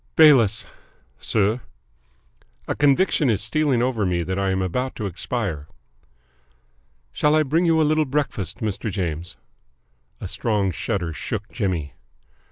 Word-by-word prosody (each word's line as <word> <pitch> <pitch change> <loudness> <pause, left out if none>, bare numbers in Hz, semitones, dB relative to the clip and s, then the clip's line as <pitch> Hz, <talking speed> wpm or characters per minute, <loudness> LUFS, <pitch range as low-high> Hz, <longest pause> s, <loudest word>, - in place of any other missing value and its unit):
"Bayliss." 130 -10 +6 0.5
"Sir?" 110 +3 +1 1.1
"A - - 0
conviction 145 0 +3
is 105 -4 +2
stealing 135 +1 +1
over 125 -4 0
me 90 -2 0
that 95 +3 -2
I 95 0 0
am 95 0 0
about 125 +9 -2
to 110 - -4
expire." 95 - -3 1.4
"Shall 150 +1 +2
I 155 - +4
bring 160 +5 +1
you 165 -1 +4
a - - +4
little 155 +1 +2
breakfast, 130 -7 -2
Mr. 110 0 -2
James?" 85 -3 -4 0.8
A - - -5
strong 105 -4 0
shudder 90 0 -2
shook 105 +8 -5
Jimmy. 90 -9 -2
110 Hz, 135 wpm, -23 LUFS, 95-140 Hz, 1.4 s, Bayliss